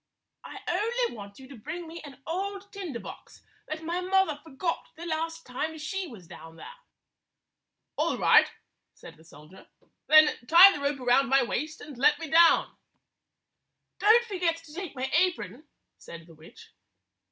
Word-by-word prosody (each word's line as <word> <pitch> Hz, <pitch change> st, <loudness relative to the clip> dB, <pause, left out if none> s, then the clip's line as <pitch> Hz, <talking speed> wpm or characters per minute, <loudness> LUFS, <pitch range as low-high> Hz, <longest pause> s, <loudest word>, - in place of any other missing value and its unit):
I -, -, -10 dB
only 455 Hz, -, -1 dB
want 200 Hz, -2 st, -11 dB
you 265 Hz, -, -13 dB
to 280 Hz, -, -11 dB
bring 320 Hz, +9 st, -8 dB
me 335 Hz, +1 st, -9 dB
an 275 Hz, -2 st, -13 dB
old 395 Hz, +3 st, -5 dB
tinder 355 Hz, -, -6 dB
box -, -, -12 dB, 0.2 s
that 315 Hz, +1 st, -6 dB
my 345 Hz, +3 st, -3 dB
mother 365 Hz, -5 st, 0 dB
forgot 325 Hz, +2 st, -4 dB
the 340 Hz, -, -8 dB
last 325 Hz, 0 st, -4 dB
time 310 Hz, +6 st, -5 dB
she 365 Hz, +5 st, -5 dB
was 215 Hz, -, -13 dB
down 165 Hz, 0 st, -13 dB
there." 475 Hz, -, -11 dB, 1.2 s
"All -, -, 0 dB
right," -, -, +5 dB, 0.5 s
said -, -, -14 dB
the 160 Hz, -, -20 dB
soldier. 155 Hz, +3 st, -17 dB, 0.4 s
"Then 310 Hz, -1 st, +6 dB
tie 355 Hz, +6 st, +9 dB
the 290 Hz, -, -6 dB
rope 280 Hz, 0 st, -2 dB
around 250 Hz, +2 st, +2 dB
my 270 Hz, 0 st, +4 dB
waist 305 Hz, +6 st, -4 dB
and 295 Hz, -2 st, -10 dB
let 295 Hz, +3 st, +4 dB
me 320 Hz, -2 st, -8 dB
down." 335 Hz, +1 st, +4 dB, 1.2 s
163 415 Hz, -, +1 dB
"Don't 470 Hz, +2 st, +6 dB
forget 355 Hz, -6 st, -1 dB
to 300 Hz, -, -15 dB
take 360 Hz, -3 st, -7 dB
my 260 Hz, 0 st, -3 dB
apron," 315 Hz, -, -1 dB, 0.3 s
said 170 Hz, -1 st, -12 dB
the 165 Hz, -, -17 dB
witch. 160 Hz, +1 st, -17 dB
315 Hz, 165 wpm, -27 LUFS, 265-355 Hz, 1.2 s, tie